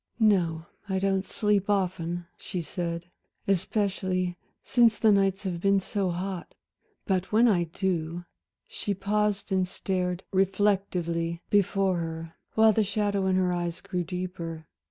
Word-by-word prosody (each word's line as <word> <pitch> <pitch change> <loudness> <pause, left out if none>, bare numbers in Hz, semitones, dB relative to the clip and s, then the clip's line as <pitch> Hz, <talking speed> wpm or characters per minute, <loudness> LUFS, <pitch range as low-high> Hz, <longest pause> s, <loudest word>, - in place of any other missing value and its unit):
"No, 175 -7 +3 0.2
I 190 - +1
don't 195 0 +1
sleep 210 -2 +1
often," 175 -3 0
she 180 - -5
said, 170 0 -4 0.4
"especially 185 -2 0 0.3
since 235 -3 +4
the 220 - +5
nights 195 0 +2
have 175 -3 -3
been 195 +1 +4
so 195 0 -1
hot. 180 0 -4 0.5
But 190 -1 0
when 225 +3 +5
I 180 -6 +3
do" 170 -1 -2 0.4
she 405 - -3
paused 205 +1 0
and 185 -1 +2
stared 180 -1 -2
reflectively 185 -4 +1
before 195 -2 +3
her, 165 -1 -5 0.2
while 220 0 +6
the 220 - +3
shadow 205 -1 0
in 190 - +2
her 185 -1 +2
eyes 175 -1 -2
grew 180 -2 -3
deeper. 170 -2 -5
190 Hz, 135 wpm, -27 LUFS, 175-200 Hz, 0.5 s, while